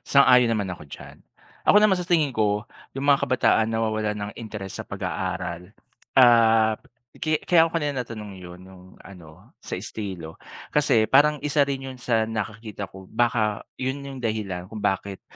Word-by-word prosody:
sang-ayon 125 -3 +5
naman 100 -4 -1
ako 85 - -10
diyan. - - -11 0.5
Ako - - +7
naman 210 -3 +5
sa 180 0 -5
tingin 160 -6 +2
ko, 105 -3 0 0.3
yung 135 - -3
mga 140 -1 +3
kabataan 115 -3 +2
nawa-walan 110 -1 -1
ng 105 0 -5
interes 105 -4 -7
sa - - -8
pag-aaral, 95 -1 -4 0.4
ah, 115 -3 +6 0.4
ki 155 -1 0
kaya 165 -2 +5
ako - - -6
kanina 145 -5 -1
na-tanong 110 -4 -7
yun 90 0 -11
yung 95 -1 -15 0.2
ano, 85 -5 -15
sa - - -5
estilo. 90 -7 -7 0.3
Kasi 135 -7 +3
parang 150 +3 +5
isa 145 -1 +2
rin 135 -1 -3
yun 130 - -10
sa 115 -2 +1
nakikita 110 -1 -5
ko, 95 0 -12
baka 110 -3 +1 0.2
yun 130 +2 -3
yung 135 -1 -7
dahilan 100 -5 -3
kung 110 -2 -7
bakit, 95 0 -2
110 Hz, 165 wpm, -24 LUFS, 100-135 Hz, 0.5 s, Ako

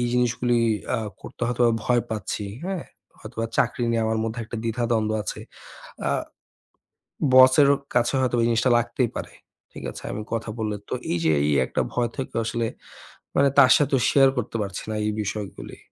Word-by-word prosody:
এই 120 - +1
জিনিসগুলি 120 0 +1 0.4
আ - - -1 0.2
করতে - - -11
হয়তোবা 120 -1 +2
ভয় 120 -1 +2
পাচ্ছি। 105 -1 -3 0.2
হ্যাঁ, 190 -2 -3 0.4
হয়তোবা 115 0 -4
চাকরি 120 - +1
নিয়ে 115 -1 +1
আমার 110 0 0
মধ্যে 115 +1 -3
একটা 115 +1 -7
দ্বিধাদ্বন্দ্ব 115 -1 0
আছে। - - -5 0.7
আ - - +1 1.2
বসেরও 130 +2 +7 0.2
কাছে 120 +2 +2
হয়তো 125 -2 +1
এই - - +3
জিনিসটা 120 +2 +2
লাগতেই 120 0 -1
পারে। - - -5 0.4
ঠিক - - -9
আছে - - -10
আমি 105 +2 -4
কথা 115 -1 -2
বললে। 105 -1 -2
তো - - -2 0.2
এই 85 - +1
যে 80 - +4
এই 75 - +2 0.2
একটা - - -2
ভয় 120 -1 0
থেকেও 130 -3 -3
আসলে 115 0 -1 0.7
মানে 140 0 +5
তার 130 - +8
সাথেও 140 -2 +2
share 135 -1 +5
করতে 115 -1 -3
পারছি 100 - -5
না - - -2
এই 105 - 0
বিষয়গুলি। 105 0 -6
120 Hz, 175 wpm, -24 LUFS, 110-125 Hz, 1.2 s, তার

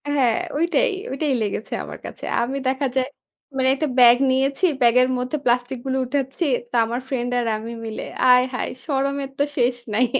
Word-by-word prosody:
হ্যাঁ, 265 -6 +2 0.2
ওইটাই, 350 +10 +2 0.2
ওইটাই 275 +1 -1
লেগেছে 210 0 -3
আমার - - -9
কাছে। - - -9 0.2
আমি 260 +4 -2
দেখা 265 +2 0
যায় 260 -1 +1 0.5
মানে 260 0 +2
একটা 310 +3 -1
ব্যাগ 245 -1 +8
নিয়েছি, 270 +6 +1 0.2
ব্যাগের 250 +1 +5
মধ্যে 250 +4 -2
প্লাস্টিক 245 +2 +1
গুলো 265 0 -1
উঠাচ্ছি। 270 +5 -2 0.3
তো - - -4
আমার 235 +2 -3
ফ্রেন্ড 245 -2 -2
আর 240 - -1
আমি 225 +2 -7
মিলে 220 -1 -5 0.3
আয় 250 0 +6
হায় 250 - -2 0.2
শরমের 275 -1 -1
তো - - +4
শেষ 245 -1 +2 0.2
নাই। 240 +4 +3
260 Hz, 175 wpm, -22 LUFS, 245-275 Hz, 0.5 s, ব্যাগ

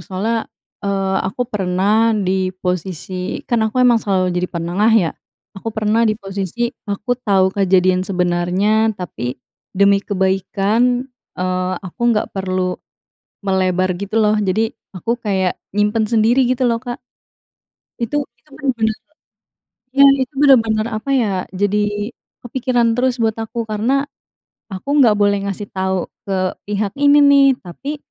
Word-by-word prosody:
Soalnya, 210 +6 -2 0.4
eee, 195 -1 0
aku 225 +6 -3
pernah 210 +1 +1
di 190 -2 0
posisi 180 0 -3
kan 240 -2 +2
aku 215 - -10
emang 240 -2 +5
selalu 185 -3 0
jadi 180 +1 -1
penengah, 175 +6 0
ya. 175 -7 +2 0.5
Aku 195 - -5
pernah 220 +1 +1
di 215 - 0
posisi, 195 +4 -3 0.2
aku 205 +5 -1
tahu 190 -5 +2
kejadian 185 -2 +3
sebenarnya, 185 +4 +1
tapi 145 -9 -5 0.4
demi 200 0 +4
kebaikan, 200 +6 +1 0.3
eee, 185 0 -1
aku 185 - -10
nggak 210 - -1
perlu 185 -1 -1 0.7
melebar 185 -1 +1
gitu, 200 +4 -5
lo. 210 -1 +3
Jadi, 215 +3 0 0.2
aku 225 +6 -1
kayak, 190 -4 -1 0.2
nyimpen 210 +1 +1
sendiri, 230 +3 +3
gitu 255 0 0
lo, 230 -2 +1
Kak. 245 -1 -5 1.0
Itu 240 +5 -1 0.2
itu 240 - -31
bener-bener 230 -6 -1 1.0
iya, 275 +2 +6 0.2
itu 260 +2 -6
bener-bener, 225 -6 +4
apa 230 +3 -4
ya, 250 -6 +2 0.2
jadi 205 +3 -1 0.3
kepikiran 245 -1 +1
terus 250 +1 +1
buat 225 -2 +1
aku. 230 +1 -4
Karena, 230 +6 0 0.7
aku 190 +8 -7
nggak 220 -4 +5
boleh 200 -1 +2
ngasih 200 +1 -4
tahu 190 -1 -1 0.2
ke 185 -2 -1 0.2
pihak 205 -1 -1
ini, 285 +1 +5
nih. 280 -1 +6
Tapi, 275 - -6
205 Hz, 135 wpm, -18 LUFS, 190-230 Hz, 1.0 s, iya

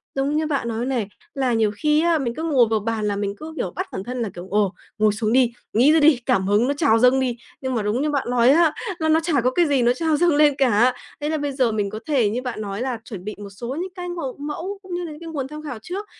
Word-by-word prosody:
giống 275 +2 0
như 310 0 +1
bạn 280 -5 -1
nói 230 +1 -2
này, 245 -6 -1 0.3
là 265 -4 0
nhiều 220 -2 +2
khi 300 +6 +2
á, 335 0 +3
mình 235 -3 -2
cứ 320 - -4
ngồi 280 -7 +4
vào 220 - +1
bàn 220 0 -2
là 205 - 0
mình 200 0 -2
cứ, 315 +1 -8
kiểu, 180 - -2
bắt - - -3
bản 190 - -5
thân 245 +2 -4
là 220 - -1
kiểu: 175 +2 -8
"Ồ, 205 -2 +1 0.2
ngồi 215 0 +4
xuống 215 +1 -1
đi, 250 -2 +4 0.2
nghĩ 250 +7 +5
ra 320 - +5
đi, 295 -4 +5
cảm 190 0 +1
hứng 210 +4 +3
nó 280 - +1
trào 280 -7 +3
dâng 250 +2 +5
đi." 245 -2 -1 0.2
nhưng 260 -1 -2
mà 225 - 0
đúng 210 +5 0
như 300 - 0
bạn 280 -4 -1
nói 245 0 +4
á, 315 +1 +5 0.3
là 315 0 0
nó 320 +1 +5
chả 320 -5 +1
có 255 - +2
cái 345 +6 +3
gì 280 -3 +2
nó 240 +1 +4
trào 315 +2 0
dâng 340 -2 +3
lên 295 -1 +5
cả. 245 -1 +4 0.3
Thế 295 - -1
là 315 - 0
bây 290 -1 -2
giờ 255 -4 +1
mình 205 -2 -1
có 215 +2 -6
thể 260 -8 +2
như 235 +4 -2
bạn 250 -4 -5
nói 200 +2 -4
là 250 -3 -2
chuẩn 190 -5 -8
bị 210 +1 -5
một 205 -1 -8
số 235 +6 -6
những 375 - -4
cái 355 -1 -5
màu 325 -7 -4
mẫu 335 +7 -5
cũng 375 -2 -9
như 355 - -3
là 330 - -6
những 300 - -10
cái 330 - -7
nguồn 280 -5 -3
tham 300 +1 -8
khảo 270 -7 -6
trước, 385 - -5
255 Hz, 305 wpm, -22 LUFS, 220-300 Hz, 0.3 s, nghĩ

